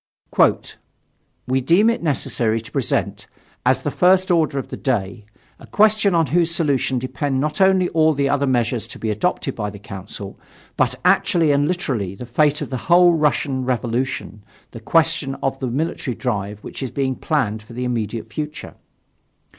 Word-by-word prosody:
"We 130 Hz, +1 st, 0 dB
deem 175 Hz, -, +4 dB
it 230 Hz, -, +1 dB
necessary 120 Hz, -7 st, 0 dB
to 115 Hz, -, -12 dB
present, -, -, -2 dB, 0.4 s
as 130 Hz, +1 st, +2 dB
the 145 Hz, -, -1 dB
first 185 Hz, +2 st, +3 dB
order 160 Hz, -4 st, +2 dB
of 135 Hz, -, -4 dB
the -, -, -5 dB
day, 105 Hz, -4 st, -2 dB, 0.3 s
a -, -, -14 dB
question 215 Hz, -2 st, +3 dB
on 165 Hz, -1 st, +3 dB
whose 170 Hz, -1 st, +3 dB
solution 145 Hz, -6 st, 0 dB
depend 130 Hz, +2 st, -2 dB
not 150 Hz, +6 st, -1 dB
only 190 Hz, -1 st, +4 dB
all 160 Hz, -1 st, +3 dB
the 140 Hz, 0 st, +1 dB
other 140 Hz, 0 st, +1 dB
measures 120 Hz, -2 st, 0 dB
to -, -, -10 dB
be 110 Hz, -, -2 dB
adopted 135 Hz, -, -1 dB
by 105 Hz, -2 st, -3 dB
the 100 Hz, -, -10 dB
Council, 100 Hz, -1 st, -9 dB, 0.4 s
but -, -, +1 dB
actually 185 Hz, -4 st, +3 dB
and 145 Hz, +1 st, +2 dB
literally 130 Hz, -, -2 dB
the 125 Hz, -, -8 dB
fate 150 Hz, +5 st, +1 dB
of -, -, -8 dB
the 130 Hz, -, -2 dB
whole 175 Hz, 0 st, +6 dB
Russian 145 Hz, -4 st, 0 dB
revolution 125 Hz, -2 st, -2 dB, 0.3 s
the 115 Hz, -, -9 dB
question 160 Hz, +2 st, +1 dB
of 135 Hz, 0 st, -3 dB
the 130 Hz, -, -2 dB
military 130 Hz, -1 st, -2 dB
drive 105 Hz, -4 st, -3 dB
which -, -, -8 dB
is 130 Hz, -, -3 dB
being 130 Hz, +2 st, -1 dB
planned 120 Hz, -10 st, -1 dB
for 110 Hz, +3 st, -14 dB
the 125 Hz, +2 st, -4 dB
immediate 115 Hz, -2 st, -3 dB
future. 150 Hz, -1 st, -6 dB
135 Hz, 170 wpm, -21 LUFS, 120-165 Hz, 0.4 s, whole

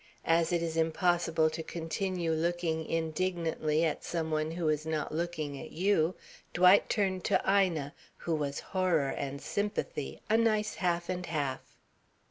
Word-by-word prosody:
As 165 Hz, 0 st, +3 dB
it 170 Hz, -1 st, +1 dB
is 165 Hz, -1 st, -2 dB
impossible 165 Hz, -1 st, +2 dB
to 160 Hz, +1 st, -4 dB
continue 170 Hz, +1 st, -2 dB
looking 160 Hz, 0 st, -1 dB
indignantly 165 Hz, -1 st, 0 dB
at 160 Hz, -, -2 dB
some 160 Hz, -2 st, -2 dB
one 155 Hz, 0 st, 0 dB
who 165 Hz, 0 st, -2 dB
is 155 Hz, 0 st, +1 dB
not 155 Hz, -1 st, -2 dB
looking 155 Hz, -4 st, -3 dB
at 160 Hz, -, -8 dB
you, 180 Hz, -1 st, +2 dB, 0.4 s
Dwight 180 Hz, +3 st, +6 dB
turned 190 Hz, -4 st, 0 dB
to -, -, +3 dB
Ina, 180 Hz, -7 st, +2 dB, 0.2 s
who 170 Hz, -, -2 dB
was 145 Hz, -2 st, -1 dB
horror 175 Hz, -7 st, +2 dB
and 140 Hz, +1 st, -4 dB
sympathy, 205 Hz, -6 st, -3 dB
a 220 Hz, -, +4 dB
nice 215 Hz, -2 st, +2 dB
half 175 Hz, -1 st, 0 dB
and 180 Hz, -1 st, -3 dB
half. 145 Hz, -5 st, -3 dB
165 Hz, 150 wpm, -31 LUFS, 155-180 Hz, 0.4 s, Dwight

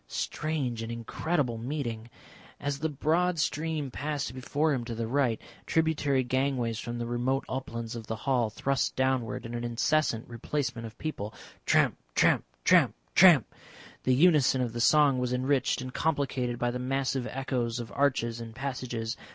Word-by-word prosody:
Strange 135 Hz, -, -2 dB
and 115 Hz, 0 st, -4 dB
incredible 120 Hz, +2 st, -1 dB
meeting! 120 Hz, -3 st, -4 dB, 0.5 s
As 140 Hz, -1 st, -2 dB
the 160 Hz, -, 0 dB
broad 165 Hz, +5 st, +1 dB
stream 155 Hz, -2 st, -1 dB
passed 145 Hz, -2 st, -3 dB
before 145 Hz, +4 st, 0 dB
him 125 Hz, -3 st, -1 dB
to 115 Hz, -1 st, -5 dB
the 115 Hz, 0 st, -2 dB
right, 125 Hz, -1 st, +1 dB, 0.3 s
tributary 155 Hz, -4 st, +2 dB
gangways 125 Hz, -3 st, 0 dB
from 120 Hz, 0 st, -5 dB
the 120 Hz, -, -3 dB
remote 120 Hz, +3 st, 0 dB
uplands 115 Hz, -3 st, -4 dB
of 115 Hz, -2 st, -7 dB
the 110 Hz, -, -2 dB
hall 120 Hz, 0 st, +1 dB
thrust 135 Hz, +4 st, -1 dB
downward 130 Hz, -3 st, 0 dB
in 115 Hz, -, -6 dB
an 120 Hz, 0 st, -3 dB
incessant 120 Hz, 0 st, +1 dB
replacement 120 Hz, 0 st, -3 dB
of 110 Hz, -, -14 dB
people; 110 Hz, -9 st, -5 dB, 0.3 s
tramp, -, -, +4 dB, 0.2 s
tramp, -, -, +4 dB, 0.2 s
tramp, -, -, +5 dB, 0.2 s
tramp. -, -, +7 dB, 0.6 s
The 130 Hz, -, +2 dB
unison 145 Hz, -4 st, +4 dB
of 120 Hz, -3 st, -2 dB
the 120 Hz, -, -2 dB
song 145 Hz, 0 st, +5 dB
was 125 Hz, 0 st, -1 dB
enriched 130 Hz, +1 st, +1 dB
and 130 Hz, 0 st, -6 dB
complicated 135 Hz, -6 st, 0 dB
by 120 Hz, 0 st, 0 dB
the 125 Hz, -, -4 dB
massive 135 Hz, 0 st, -1 dB
echoes 125 Hz, -3 st, -2 dB
of 115 Hz, -3 st, -6 dB
arches 120 Hz, -4 st, 0 dB
and 115 Hz, -1 st, -8 dB
passages. 125 Hz, -4 st, -3 dB
130 Hz, 160 wpm, -29 LUFS, 120-140 Hz, 0.6 s, tramp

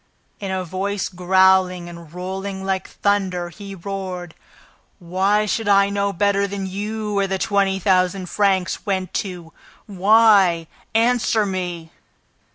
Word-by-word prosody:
In 195 Hz, -, -5 dB
a 190 Hz, -1 st, -2 dB
voice 190 Hz, +3 st, -3 dB
growling 185 Hz, 0 st, +3 dB
and 170 Hz, -2 st, -11 dB
rolling 190 Hz, +2 st, -5 dB
like 190 Hz, -1 st, -1 dB
thunder, 190 Hz, -4 st, -1 dB
he 195 Hz, +3 st, -9 dB
roared: 185 Hz, -2 st, -6 dB, 0.6 s
"Why 195 Hz, +4 st, +1 dB
should 220 Hz, +1 st, -2 dB
I 200 Hz, 0 st, +5 dB
know 200 Hz, 0 st, 0 dB
better 200 Hz, +1 st, +1 dB
than 195 Hz, 0 st, -4 dB
you 210 Hz, +3 st, -4 dB
where 200 Hz, -1 st, +1 dB
the 190 Hz, 0 st, -1 dB
twenty 195 Hz, -1 st, +1 dB
thousand 185 Hz, 0 st, +1 dB
francs 190 Hz, -1 st, 0 dB
went 190 Hz, -3 st, -2 dB
to? 175 Hz, -4 st, -9 dB, 0.3 s
Why? 200 Hz, -3 st, +4 dB, 0.3 s
Answer 225 Hz, -2 st, +2 dB
me!" 175 Hz, -4 st, -4 dB
190 Hz, 130 wpm, -21 LUFS, 180-200 Hz, 0.6 s, I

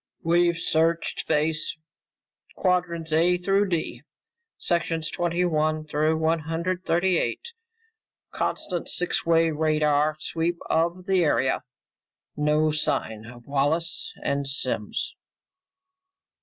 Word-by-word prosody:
"We've 170 Hz, +1 st, +3 dB
searched 165 Hz, 0 st, +1 dB
space 155 Hz, +1 st, 0 dB, 0.8 s
quadrants 175 Hz, -3 st, 0 dB
A 175 Hz, +3 st, +4 dB
through 195 Hz, +2 st, +2 dB
D, 170 Hz, -3 st, -2 dB, 0.6 s
sections 165 Hz, -2 st, -1 dB
twenty 175 Hz, +1 st, 0 dB
one 155 Hz, -2 st, 0 dB
through 155 Hz, +1 st, +1 dB
one 160 Hz, +1 st, +2 dB
hundred 170 Hz, +4 st, -2 dB
thirty 175 Hz, +1 st, +2 dB
eight. 470 Hz, -, -3 dB, 0.8 s
Constant 175 Hz, -3 st, -2 dB
six 180 Hz, -1 st, -1 dB
way 165 Hz, -1 st, +4 dB
radar 150 Hz, -1 st, +2 dB
sweep 165 Hz, +2 st, -1 dB
of 170 Hz, +3 st, +1 dB
the 190 Hz, -2 st, +3 dB
area. 135 Hz, -4 st, +2 dB, 0.7 s
No 150 Hz, +1 st, +2 dB
sign 110 Hz, -7 st, -1 dB
of 120 Hz, 0 st, -12 dB
Wallace 145 Hz, +4 st, -1 dB
and 140 Hz, 0 st, -1 dB
Simms." 135 Hz, +1 st, -2 dB
165 Hz, 105 wpm, -25 LUFS, 155-175 Hz, 0.8 s, A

